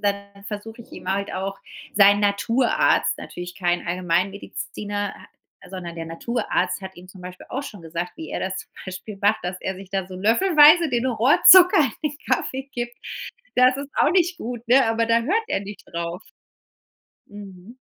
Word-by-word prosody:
dann 200 -1 -3
versuche 220 +3 -7
ich - - -23
ihm 190 - -4
halt 200 +1 -3
auch 195 +1 -4 0.4
sein 205 0 +6
Naturarzt, 210 +5 +2
natürlich 175 0 -8
kein 175 -2 -1
Allgemeinmediziner, 195 +3 -3
ha - - -15 0.4
sondern 175 -3 -7
der 165 0 -5
Naturarzt 185 +1 -2
hat 190 0 -8
ihm 180 +1 -13
zum 185 0 -14
Beispiel 180 0 -10
auch 275 +2 -4
schon 205 -10 -10
gesagt, 170 +2 -5
wie 160 - -8
er - - -3
das 190 0 -3
zum - - -10 0.2
Beispiel 195 +2 -8
macht, 205 +2 +2
dass 180 +1 -5
er 190 - -3
sich 190 0 -12
da 190 -1 -2
so 185 - -10
löffelweise 305 - +5
den 245 -2 -1
Rohrzucker 295 - +7 0.2
in 300 - -1
den 295 - -14
Kaffee 265 +1 -1
gibt. 240 0 -4 0.6
Das 255 +1 +5
ist 280 0 -6
auch - - +3
nicht 355 -1 +2
gut, 240 -3 -6
ne? 260 0 +5
Aber 225 +1 +1
da 230 0 +3
hört 380 - 0
er - - 0
nicht 200 +1 -9
drauf. 170 +1 -4 1.1
Mhm. 200 +1 -12
205 Hz, 180 wpm, -23 LUFS, 185-240 Hz, 1.1 s, Rohrzucker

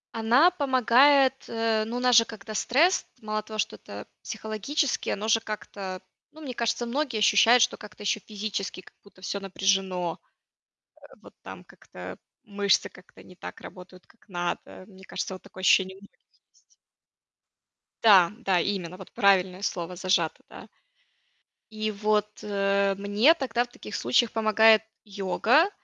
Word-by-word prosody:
Она 240 +10 +4
помогает, 270 -2 +4 0.2
э, 225 -1 0
ну, 230 +2 -6
у - - -2
нас 250 0 +3
же 230 - +8
когда 215 -1 -10
стресс, 305 - +2
мало 215 0 -3
того, 215 0 -9
что 150 - -2
это 100 0 -10
психологически, 220 - -3
оно 210 +2 -3
же 225 0 +4
как-то, 195 -3 -7 0.3
ну, 315 - -15
мне 270 -4 -6
кажется, 235 0 -1
многие 260 0 -2
ощущают, 225 +3 +5
что - - -1
как-то 210 -1 -12
ещё 210 - 0
физически 205 -2 -5
как - - -19
будто 200 -2 -20
всё 200 - -3
напряжено, 190 -3 -1
э, - - -43 0.8
вот - - -16
там - - -10
как-то - - -11 0.3
мышцы 200 -2 +1
как-то 185 - -18
не 180 - -16
так - - -10
работают, 180 0 -13
как 230 - -27
надо. 175 0 -5
Мне 190 -2 -17
кажется, 190 0 -5
вот 185 - -11
такое 190 - -12
ощущение 190 0 +3
у - - -17
многих 200 - -19 0.3
есть. - - -33 1.3
Да, 195 -4 +6
да, 195 -6 +1
именно, 180 -2 -3
вот 190 - -13
правильное 190 -2 +2
слово 180 -3 -4
зажато, 175 -3 0
да. - - -12 1.0
И 215 0 -3
вот, 210 0 0 0.2
э, 200 -1 0
мне 205 +9 +4
тогда 245 -7 -1
в - - -12
таких 110 - -10
случаях 125 - +1
помогает 220 0 +4 0.2
йога, 215 - +2
210 Hz, 155 wpm, -26 LUFS, 190-230 Hz, 1.3 s, же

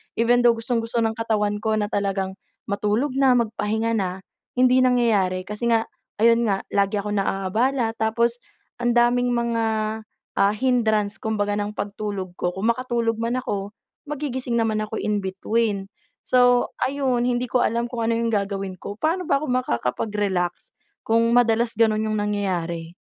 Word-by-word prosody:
Even 240 +1 +3
though 235 - +7
gustong-gusto 230 0 -1
ng 225 0 -1
katawan 210 -2 0
ko 220 0 0
na 210 -1 -1
talagang 195 -2 -2 0.3
matulog 210 +7 0
na, 270 -2 +5
magpahinga 225 0 0
na, 185 -1 -2 0.3
hindi 255 0 +4
nangyayari 225 -8 +2
kasi 210 +4 -3
nga, 225 0 +3 0.4
ayun 230 0 +5
nga 195 -2 0
lagi 200 +1 +1
akong 210 0 -3
naabala, 225 +6 0
tapos 235 +2 +1 0.4
ang 240 0 +1
daming 245 +1 +3
mga, 235 -1 0 0.7
ah, 200 +1 +4
hindrance 220 -4 +1
kumbaga 205 -2 -1
ng 205 0 -3
pagtulog 200 -3 -5
ko. 175 - -1
Kung 195 +5 -1
makatulog 235 -2 0
man 235 +2 -1
ako, 200 -2 -4 0.3
magigising 265 -4 -3
naman 220 -2 +1
ako 220 +1 -5
in 210 -1 0
between. 195 +1 -1 0.3
So 245 -1 +3 0.2
ayun, 260 -3 0
hindi 245 0 0
ko 250 - +2
alam 235 +1 -1
kung 235 -2 -2
ano 230 - +2
yung 230 0 0
gagawin 195 -3 -2
ko. 200 - -7
Paano 350 +4 0
ba 280 -2 +1
ako 305 - -4
makakapag-relax 200 - -1 0.3
kung 230 +1 +2
madalas 235 -1 +3
ganun 220 -1 +2
yung 215 0 -1
nangyayari? 175 -5 -2
225 Hz, 155 wpm, -23 LUFS, 205-240 Hz, 0.7 s, though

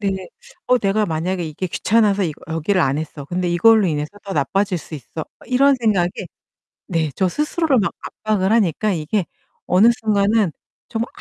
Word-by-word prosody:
네. 190 -2 -2 0.4
'어 250 - +4
내가 210 0 +1
만약에 175 +2 -2
이게 155 +4 -4
귀찮아서 205 +2 +2
이 160 - -2 0.2
여기를 165 +4 0
안 140 -2 +1
했어. 155 -2 -6
근데 180 +4 -2
이걸로 205 +5 +5
인해서 150 -3 -1 0.2
더 200 - -5
나빠질 195 0 0
수 160 - -10
있어.' 155 +3 -7 0.2
이런 275 +3 +4
생각에 200 -7 +2 0.8
네, 165 -4 0
저 190 - +2
스스로를 300 - +1
막 200 - 0 0.3
압박을 210 -2 +1
하니까 210 -1 +2
이게 175 +4 -1 0.4
어느 190 +6 +5
순간은 205 -3 +2 0.4
정말 230 0 -2
195 Hz, 330 characters per minute, -20 LUFS, 165-215 Hz, 0.8 s, 이걸로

